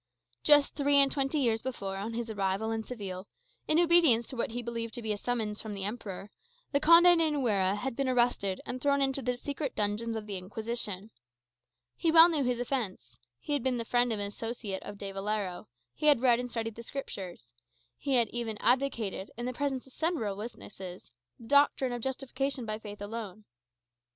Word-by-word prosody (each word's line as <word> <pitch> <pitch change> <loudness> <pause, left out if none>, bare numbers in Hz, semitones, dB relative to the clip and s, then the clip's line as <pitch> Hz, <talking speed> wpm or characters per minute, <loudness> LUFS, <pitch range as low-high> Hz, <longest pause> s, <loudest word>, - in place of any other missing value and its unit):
Just 290 -2 +6
three 285 0 +2
and 275 -1 +6
twenty 275 +1 0
years 230 -5 +1
before, 200 -7 -4
on 220 +4 -4
his 235 0 -3
arrival 200 0 -1
in 225 0 -2
Seville, 200 -5 -7 0.4
in 310 - +3
obedience 335 -9 +5
to 260 - -8
what 235 - -1
he 240 +2 -4
believed 230 -1 -4
to 240 - -4
be 215 -1 0
a - - -3
summons 220 -2 -2
from 215 -2 -6
the 195 - -5
Emperor, 205 -2 -6 0.4
the 280 - +2
Conde 335 +3 +7
de 320 -1 +3
Nuera 210 -10 +1
had 240 +4 -4
been 275 0 0
arrested 240 -6 +1
and 255 0 -5
thrown 280 0 +2
into 275 0 +1
the 250 -1 -1
secret 280 +1 -4
dungeons 215 +2 -1
of 220 -1 -4
the 200 -2 -5
Inquisition. 215 +1 -5 0.8
He 330 - +1
well 330 +1 +10
knew 310 -4 +1
his 245 -1 0
offence: 190 - -3 0.2
he 295 - -4
had 285 - +1
been 255 0 0
the 230 - -3
friend 245 +1 +2
and 215 - -1
associate 205 0 -4
of 205 - -8
De 200 -1 -5
Valero; 195 -2 -3 0.3
he 305 - -1
had 290 -5 +6
read 245 -2 +5
and 245 0 -4
studied 225 -1 -3
the 230 - -9
Scriptures; 190 - -7 0.4
he 275 -2 -1
had 235 -2 +4
even 230 -3 -3
advocated, 235 -7 0
in 240 - -4
the 255 - -2
presence 270 -1 -2
of 265 - -17
several 310 - -1
witnesses, 195 - -9 0.3
the 230 - -12
doctrine 280 -1 +3
of 240 -1 -4
justification 265 0 -3
by 215 0 -4
faith 205 -2 -8
alone. 215 -1 -7
235 Hz, 195 wpm, -30 LUFS, 205-270 Hz, 0.8 s, well